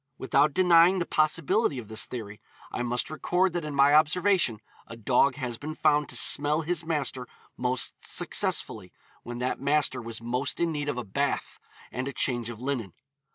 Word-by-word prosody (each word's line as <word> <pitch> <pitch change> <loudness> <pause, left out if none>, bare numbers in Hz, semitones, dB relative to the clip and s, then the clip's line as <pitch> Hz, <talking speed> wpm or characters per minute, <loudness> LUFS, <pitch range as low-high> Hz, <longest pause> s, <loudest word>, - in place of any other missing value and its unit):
Without 145 +3 +2
denying 180 +1 +5
the 175 - -1
possibility 150 -3 +1
of 120 -4 -7
this 110 0 0
theory, 105 -4 -8 0.3
I - - -4
must 120 +3 -2
record 180 +3 0
that 175 -2 -3
in 150 -2 -5
my 140 +1 +5
observation 155 - +2 0.3
a 115 - -9
dog 125 +4 +2
has 125 -5 -5
been 155 +1 -6
found 150 -1 +2
to - - -5
smell 150 +2 +4
his 170 +1 -2
master 140 -6 -2 0.3
most 125 0 -1
successfully 95 -5 -1 0.3
when 120 0 -8
that 125 +1 -3
master 145 0 +1
was 115 -1 -7
most 125 +4 -3
in 170 -1 0
need 145 -2 -3
of 135 - -3
a 125 - -3
bath 95 - -3 0.3
and 130 +1 -4
a 140 - -5
change 120 -3 0
of 115 -2 -8
linen. 125 -8 -4
140 Hz, 180 wpm, -27 LUFS, 120-155 Hz, 0.3 s, denying